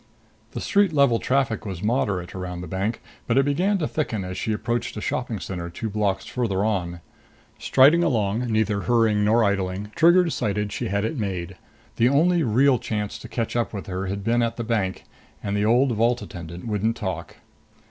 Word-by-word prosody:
The - - -4
street 200 -4 +3
level 140 -6 +4
traffic 130 -5 0
was 95 -3 -6
moderate 105 -6 0
around 90 -1 -5
the 90 - -7
bank, 100 +6 -3 0.2
but 115 - +2
it 135 - +4
began 180 +8 +1
to 160 -5 -1
thicken 110 -11 -2
as 90 0 -5
she 95 +4 -2
approached 120 +2 -2
a - - -2
shopping 115 -1 -2
center 85 -3 -5
two 110 +5 -5
blocks 100 -2 0
farther 105 -5 -1
on. 90 -5 -2 0.6
Striding 150 +6 +5
along, 115 -4 0
neither 110 -2 +1
hurrying 115 -3 +2
nor 110 +3 +4
idling, 100 0 -1
Trigger 175 +2 +5
decided 105 - -1
she - - -3
had 100 +2 0
it 140 - -3
made. 95 -3 -3 0.4
The 120 +2 +4
only 170 +5 +3
real 130 0 +3
chance 105 -2 -3
to - - -9
catch 115 -1 -3
up 120 -1 -1
with 100 - -5
her 95 0 -4
had 100 +1 -4
been 120 +3 +2
at 115 0 -1
the 120 - -2
bank. 105 -5 -1 0.4
And 100 0 -2
the 105 0 +1
old 125 +4 +3
vault 120 +2 +1
attendant 85 0 -8
wouldn't 110 +1 -1
talk. 95 -4 -5
110 Hz, 190 wpm, -24 LUFS, 100-125 Hz, 0.6 s, Striding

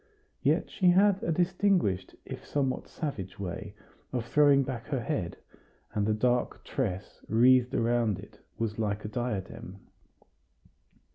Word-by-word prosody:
Yet - - +1
she 185 -3 +3
had 195 +2 +5
a 170 - 0
distinguished 175 - +1
if - - -7
somewhat 135 -3 -1
savage 110 - -5
way 100 +2 -5 0.4
of 125 -3 -2
throwing 145 +1 +5
back 125 -3 -5
her 135 -4 -1
head, 90 -6 -2 0.6
and 105 -1 0
the 110 - +3
dark 125 +2 0
tress 100 -8 -3
wreathed 125 +2 +5
around 115 -3 +2
it 100 +2 -13 0.2
was 115 -1 -2
like 105 -1 -1
a - - -3
diadem. 105 -5 -4
120 Hz, 135 wpm, -29 LUFS, 105-140 Hz, 0.6 s, had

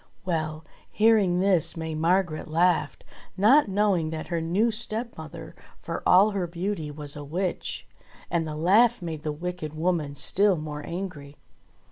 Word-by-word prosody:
Well! 155 -3 -2 0.2
hearing 210 -5 +3
this 185 -5 +2
May 160 -1 -4
Margret 165 0 0
laughed, 160 -3 +1 0.3
not 235 +9 +5
knowing 195 -5 +1
that 160 0 -6
her 170 -2 -1
new 195 +8 +1
stepmother, 220 - -3 0.2
for - - -5
all 195 +4 +6
her 190 -3 -2
beauty, 170 -1 -3
was 145 -1 -6
a 145 - -7
witch; 175 +5 -3 0.5
and 165 -2 0
the 155 - -5
laugh 205 +7 +3
made 160 -3 -5
the 155 -1 -3
wicked 160 -1 -5
woman 160 -3 -1
still 195 +6 +2
more 150 -1 -6
angry. 165 -5 -6
170 Hz, 145 wpm, -26 LUFS, 155-195 Hz, 0.5 s, all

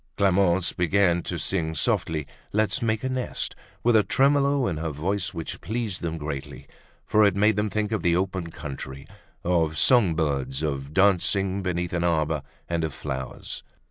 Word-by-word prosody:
Clemence 95 -2 +3
began 90 0 +2
to - - -4
sing 80 -4 -1
softly 75 +1 0 0.3
"Let's 110 +6 +1
Make 110 0 0
a 130 - 0
Nest" 130 -1 -3 0.3
with 120 -1 +4
a 110 - +7
tremolo 140 +2 +3
in 85 - -1
her 80 +1 -2
voice 95 +6 -1
which 85 -4 -6
pleased 110 0 -3
them 80 -2 -2
greatly 75 -3 -6 0.4
for 110 - +4
it 100 -3 +4
made 105 +2 +4
them 105 +1 0
think 105 0 -1
of 110 -4 0
the 85 0 +3
open 95 -2 -1
country, 70 -3 -7 0.4
of 80 -3 +1
songbirds, 80 - +2
of 70 -2 -2
dancing 95 +1 +2
beneath 90 -2 -2
an 85 -1 0
arbor, 80 -3 +1 0.3
and 85 -1 -1
of 80 -4 -3
flowers. 65 -1 -5
90 Hz, 165 wpm, -25 LUFS, 80-105 Hz, 0.4 s, a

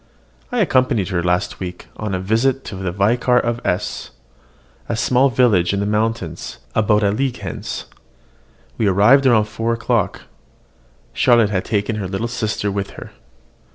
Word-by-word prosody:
I 245 -2 +1
accompanied 130 - +2
her 90 -3 0
last 90 +2 -1
week 90 -1 -6
on 105 -3 -3
a - - -2
visit 115 +8 +1
to - - -7
the 95 -1 -3
Vicar 120 +6 +2
of 120 0 -1
S, 90 - -2 0.8
a 115 - 0
small 130 +4 +3
village 110 -8 +3
in 100 - 0
the 100 - -1
mountains, 105 -5 -2 0.2
about 105 -1 +2
a 100 - +3
league 130 +4 -1
hence. - - -6 0.9
We 110 - +2
arrived 110 +9 +5
about 110 -4 +4
four 115 +1 -2
o'clock: 115 - -1 0.9
Charlotte 115 -3 +4
had 95 -2 -1
taken 105 +1 -1
her 100 -3 -3
little 95 +5 -3
sister 110 -3 -2
with 100 0 -3
her. - - -9
105 Hz, 155 wpm, -19 LUFS, 100-120 Hz, 0.9 s, arrived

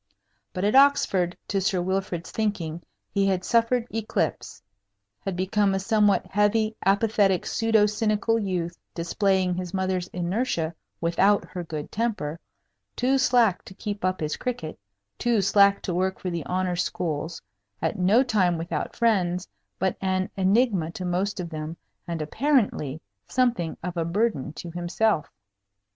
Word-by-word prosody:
But 180 - -4
at 205 - +2
Oxford, 230 -10 +4
to 195 -1 +1
Sir 190 -1 +1
Wilfrid's 185 -1 -2
thinking, 175 -7 -2 0.3
he 200 -1 +2
had 185 -2 +1
suffered 230 0 +2
eclipse 220 -1 -2 0.6
had 195 -2 -4
become 195 +2 +1
a - - 0
somewhat 210 0 +3
heavy, 215 +2 +1
apathetic, 200 -2 +2
pseudo 225 -2 +3
cynical 215 +1 +1
youth, 180 -5 -2 0.2
displaying 185 +2 +1
his 180 +1 -4
mother's 185 -1 -1
inertia 175 -2 -1 0.3
without 190 +5 +3
her 180 - -4
good 155 -3 -6
temper, 205 -9 -2 0.6
too 265 +2 +2
slack 240 -7 +3
to 190 - -11
keep 205 -1 -5
up 185 -1 0
his 150 -1 -2
cricket, 230 -11 -4 0.4
too 240 -2 +2
slack 200 +1 +4
to 180 - -2
work 190 +2 0
for 180 - -4
the 170 -2 -3
honor 185 0 0
schools, 160 -2 -2 0.4
at 210 - -2
no 205 +8 +5
time 190 -8 +2
without 165 -2 -3
friends, 185 -6 +1 0.3
but 190 -1 0
an 185 0 0
enigma 195 -3 +2
to 185 - -5
most 185 +3 -1
of 175 -2 -5
them, 155 +1 -5 0.3
and, 165 -2 -2
apparently, 200 - +1 0.3
something 240 -10 0
of 180 0 -4
a 170 - 0
burden 170 - 0
to 170 +1 -8
himself. 175 +1 0
190 Hz, 145 wpm, -25 LUFS, 175-215 Hz, 0.6 s, no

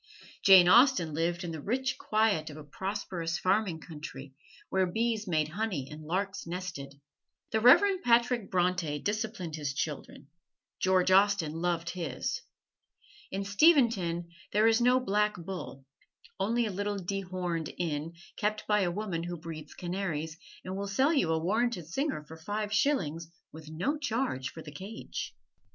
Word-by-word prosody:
Jane 190 -3 +8
Austen 235 - +5
lived 170 +3 -1
in 170 - -4
the 160 -2 -6
rich 260 - -1
quiet 215 -8 +1
of 150 - -9
a 155 - -9
prosperous 175 0 -3
farming 185 -4 +1
country, 145 -4 -9 0.4
where 190 -1 +2
bees 220 +2 -1
made 155 -3 +1
honey 180 -7 -2
and 150 +1 -8
larks 190 +2 -2
nested. 170 -6 -6 0.5
The 220 - +2
Reverend 370 - +6
Patrick 235 - +2
Bronte 180 -4 +1
disciplined 205 -3 -3
his 145 -3 -3
children: 145 -1 -4 0.5
George 185 0 +3
Austen 195 -4 +4
loved 170 0 -1
his. 175 -4 -3 0.9
In 195 +1 -3
Steventon 200 - +3 0.2
there 210 +2 +3
is 225 +1 +4
no 250 +1 +5
"Black 210 -3 +1
Bull"; 170 -6 -7 0.5
only 230 +5 +1
a 215 - -2
little 205 +2 -2
dehorned 180 -3 -3
inn, 160 -1 -2 0.2
kept 215 +1 -1
by 210 0 +3
a 185 -3 +2
woman 180 -2 -3
who 175 +1 -4
breeds 155 -2 -8
canaries, 170 -4 -3 0.3
and 185 +1 -4
will 200 +1 -3
sell 265 +11 +2
you 225 - +2
a 160 - +2
warranted 200 +2 0
singer 230 - -2
for 160 - -10
five 205 +5 -3
shillings, 170 - +1 0.2
with 155 -1 -11
no 260 - -1
charge 230 - -1
for 160 - -10
the 150 - -9
cage. 195 +9 -7
185 Hz, 150 wpm, -30 LUFS, 165-215 Hz, 0.9 s, Jane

